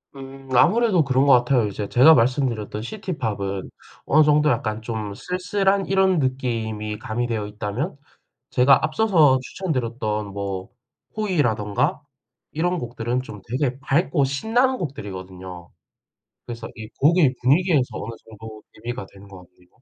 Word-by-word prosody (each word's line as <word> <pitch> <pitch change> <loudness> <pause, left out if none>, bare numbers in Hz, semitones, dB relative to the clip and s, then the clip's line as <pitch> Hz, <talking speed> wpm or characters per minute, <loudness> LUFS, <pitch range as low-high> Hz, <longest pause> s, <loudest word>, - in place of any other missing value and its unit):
음 135 0 -11
아무래도 200 - +4
그런 135 0 +2
것 140 - +6
같아요. 120 -1 +3
이제 100 0 -5
제가 135 +6 +7
말씀드렸던 115 -5 0
시티팝은 110 - -4 0.4
어느 155 +2 +5
정도 150 0 +3
약간 110 -2 -2
좀 110 -3 -4
쓸쓸한 190 - 0
이런 190 -2 +3
느낌이 115 -5 -2
가미되어 110 -1 -3
있다면 105 - -4 0.5
제가 135 +3 +4
앞서서 155 -7 +3
추천드렸던 120 - -3
뭐 100 -1 -5 0.5
호이라든가 125 - 0 0.5
이런 175 +3 0
곡들은 120 0 -3
좀 105 -5 -10
되게 130 +1 -1
밝고 145 +1 +1
신나는 230 - +1
곡들이거든요. 95 - -7 0.8
그래서 115 -1 -7
이 110 -1 -8
곡의 150 -2 +4
분위기에서 145 +1 +3
어느 115 - -6
정도 110 0 -11
대비가 120 0 -6
되는 100 0 -15
것 95 -2 -12
같네요. 90 +1 -28
125 Hz, 320 characters per minute, -23 LUFS, 110-155 Hz, 0.8 s, 제가